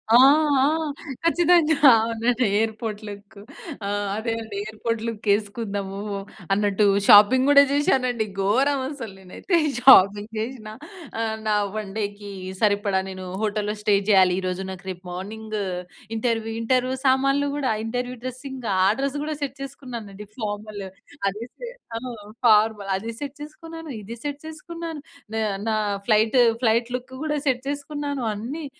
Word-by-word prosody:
ఆ! -, -, +10 dB, 0.4 s
ఆ! 265 Hz, -, +4 dB, 0.6 s
ఖచ్చితంగా 335 Hz, -2 st, +4 dB, 0.2 s
అవునండి. 230 Hz, +2 st, 0 dB
ఎయిర్‌పోర్ట్ 220 Hz, -1 st, -2 dB
లుక్ 205 Hz, +1 st, -10 dB, 0.5 s
ఆహ్ 205 Hz, 0 st, -1 dB
అదే 225 Hz, +1 st, -2 dB
అండి 220 Hz, -2 st, -8 dB
ఎయిర్‌పోర్ట్ 220 Hz, +1 st, -3 dB
లుక్ 225 Hz, -1 st, -6 dB
వేసుకుందాము 200 Hz, -2 st, -2 dB, 0.6 s
అన్నట్టు 205 Hz, 0 st, +2 dB, 0.2 s
షాపింగ్ 255 Hz, +6 st, +7 dB
కూడా 280 Hz, -1 st, +8 dB
చేశానండి. 255 Hz, -5 st, +1 dB, 0.2 s
ఘోరం 265 Hz, +8 st, +2 dB
అసలు 255 Hz, -9 st, -7 dB
నేనైతే 190 Hz, -, -2 dB, 0.2 s
షాపింగ్ 205 Hz, -4 st, +6 dB
చేసినా. 220 Hz, -2 st, -5 dB, 0.5 s
ఆ! -, -, 0 dB, 0.3 s
నా 210 Hz, -, +3 dB, 0.2 s
వన్ 210 Hz, -2 st, -4 dB
డేకి 205 Hz, -1 st, -4 dB, 0.3 s
సరిపడా 205 Hz, -2 st, +2 dB
నేను 185 Hz, 0 st, -7 dB, 0.2 s
హోటల్‌లో 210 Hz, -1 st, -1 dB
స్టే 210 Hz, -1 st, +3 dB
చేయాలి. 185 Hz, -3 st, +6 dB
ఈ -, -, -5 dB
రోజు 185 Hz, +1 st, -3 dB
నాకు 190 Hz, +1 st, -10 dB
రేపు 180 Hz, -1 st, -7 dB
మార్నింగ్ 215 Hz, +4 st, -6 dB, 0.6 s
ఇంటర్వ్యూ 225 Hz, -1 st, -1 dB
ఇంటర్వ్యూ 255 Hz, +2 st, +1 dB
సామాన్లు 275 Hz, +2 st, +3 dB
కూడా 270 Hz, -5 st, 0 dB
ఇంటర్వ్యూ 245 Hz, +2 st, -3 dB
డ్రెసింగ్ 255 Hz, -1 st, -6 dB
ఆ 185 Hz, -, +5 dB
డ్రెస్ 275 Hz, +1 st, -1 dB
కూడా 310 Hz, 0 st, -3 dB
సెట్ 275 Hz, -2 st, -3 dB
చేసుకున్నానండి. 235 Hz, -7 st, -8 dB
ఫార్మల్ 210 Hz, -1 st, -5 dB, 0.5 s
ఆదేస్తే 235 Hz, -, -8 dB, 0.2 s
తాను 230 Hz, +3 st, -5 dB, 0.4 s
ఫార్మల్ 210 Hz, -2 st, +3 dB
అది 220 Hz, +4 st, -4 dB
సెట్ 285 Hz, 0 st, -6 dB
చేసుకున్నాను 325 Hz, +1 st, -9 dB
ఇది 225 Hz, +4 st, -8 dB
సెట్ 290 Hz, -1 st, -4 dB
చేసుకున్నాను. 325 Hz, 0 st, -7 dB, 0.3 s
నా 220 Hz, -, -1 dB, 0.3 s
నా 220 Hz, -, +1 dB, 0.3 s
ఫ్లైట్, 220 Hz, +2 st, +4 dB, 0.2 s
ఫ్లైట్ 230 Hz, +1 st, +2 dB
లుక్ 255 Hz, +1 st, -7 dB
కూడా 300 Hz, -1 st, 0 dB
సెట్ 255 Hz, -1 st, +1 dB
చేసుకున్నాను. 285 Hz, -1 st, -4 dB
అన్ని 260 Hz, +10 st, -5 dB
225 Hz, 135 wpm, -24 LUFS, 205-270 Hz, 0.6 s, ఆ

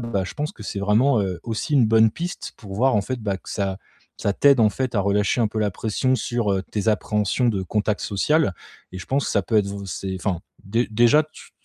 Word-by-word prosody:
bon, 120 Hz, -, -5 dB
bah, 100 Hz, -4 st, 0 dB
je 90 Hz, -, -7 dB
pense 150 Hz, +1 st, -3 dB
que 110 Hz, -, -12 dB
c'est 100 Hz, -, -4 dB
vraiment, 110 Hz, +5 st, +3 dB
heu, 95 Hz, -3 st, -3 dB
aussi 115 Hz, +6 st, -3 dB
une 130 Hz, -5 st, +5 dB
bonne 110 Hz, 0 st, +5 dB
piste 175 Hz, +9 st, -6 dB
pour 100 Hz, -3 st, -9 dB
voir 130 Hz, +5 st, +2 dB
en -, -, +3 dB
fait, 130 Hz, +4 st, -4 dB
bah, 100 Hz, -3 st, -2 dB
que -, -, -12 dB
ça 95 Hz, -1 st, -2 dB, 0.4 s
ça 100 Hz, -, 0 dB
t'aide 140 Hz, +4 st, +4 dB
en 110 Hz, -2 st, +5 dB
fait 130 Hz, +4 st, -3 dB
à 105 Hz, -, +2 dB
relâcher 100 Hz, +4 st, +1 dB
un 110 Hz, -, +2 dB
peu 110 Hz, -, -4 dB
la 105 Hz, -2 st, 0 dB
pression 115 Hz, +6 st, 0 dB
sur, 120 Hz, -5 st, -1 dB
heu, 95 Hz, -1 st, 0 dB
tes 105 Hz, 0 st, -3 dB
appréhensions 105 Hz, +2 st, +1 dB
de 100 Hz, -4 st, 0 dB
contact 105 Hz, +2 st, 0 dB
social. 145 Hz, -, +1 dB, 0.4 s
Et 95 Hz, -, -6 dB
je 90 Hz, -, -10 dB
pense 140 Hz, +1 st, 0 dB
ça -, -, +1 dB
peut 110 Hz, -, 0 dB
être 100 Hz, -, +1 dB
vous 100 Hz, 0 st, -6 dB
c'est 95 Hz, +1 st, -4 dB
enfin 90 Hz, -2 st, -2 dB, 0.2 s
dé 115 Hz, +5 st, 0 dB
déjà 120 Hz, +7 st, +4 dB
tu 155 Hz, -, -16 dB
105 Hz, 245 wpm, -23 LUFS, 100-120 Hz, 0.4 s, une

